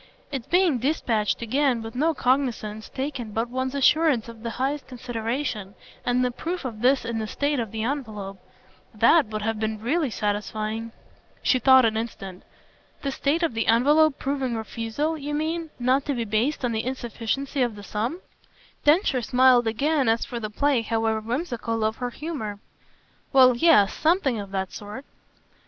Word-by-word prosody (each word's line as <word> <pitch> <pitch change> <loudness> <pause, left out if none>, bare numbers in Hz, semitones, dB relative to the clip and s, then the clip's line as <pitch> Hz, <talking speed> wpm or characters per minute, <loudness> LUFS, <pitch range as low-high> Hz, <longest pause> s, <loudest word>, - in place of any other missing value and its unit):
Its 265 -5 -4
being 350 -7 +3
dispatched 235 -6 0
again, 250 0 +1
with 225 - -7
no 300 +6 +2
cognisance 245 -5 -1
taken 265 -5 -4
but 225 +2 -1
one's 260 +1 -2
assurance 280 -3 +3
of 230 -1 -11
the 230 - -3
highest 275 +3 -2
consideration, 235 -4 -4 0.3
and 250 +1 +1
the 250 - 0
proof 335 +6 -4
of 220 -4 -5
this 260 +2 +3
in 230 -1 -2
the 215 - -3
state 285 +5 -1
of 225 -3 -2
the 220 -1 -3
envelope 215 -7 -4 0.6
THAT 320 -8 +5
would 215 0 -4
have 225 0 -1
been 220 0 -2
really 280 +6 0
satisfying." 215 +1 -3 0.5
She 255 - +3
thought 260 -1 +6
an 220 -1 +1
instant. 195 -5 -6 0.6
"The 275 - -1
state 295 +5 0
of 330 - +1
the 225 0 -1
envelope 285 +6 +4
proving 270 -3 -2
refusal, 230 +8 -3
you 295 +1 -3
mean, 320 +2 -2
not 260 +3 +1
to 285 - -1
be 235 -2 -2
based 230 +7 0
on 240 - 0
the 220 0 -1
insufficiency 255 +2 -3
of 240 -3 +1
the 205 - -10
sum?" 230 - -3 0.6
Densher 295 -4 +3
smiled 250 0 +4
again 275 +3 +1
as 225 +1 +1
for 240 - -5
the 215 -2 -4
play, 275 +3 +1
however 225 -1 0
whimsical, 230 -2 -2
of 220 +1 0
her 245 -1 -3
humour. 245 -8 -5 0.8
"Well 255 -2 +7
yes 240 -8 +5
something 310 - +1
of 200 -1 -6
that 190 -1 -3
sort." 210 +6 -8
245 Hz, 170 wpm, -25 LUFS, 220-280 Hz, 0.8 s, Well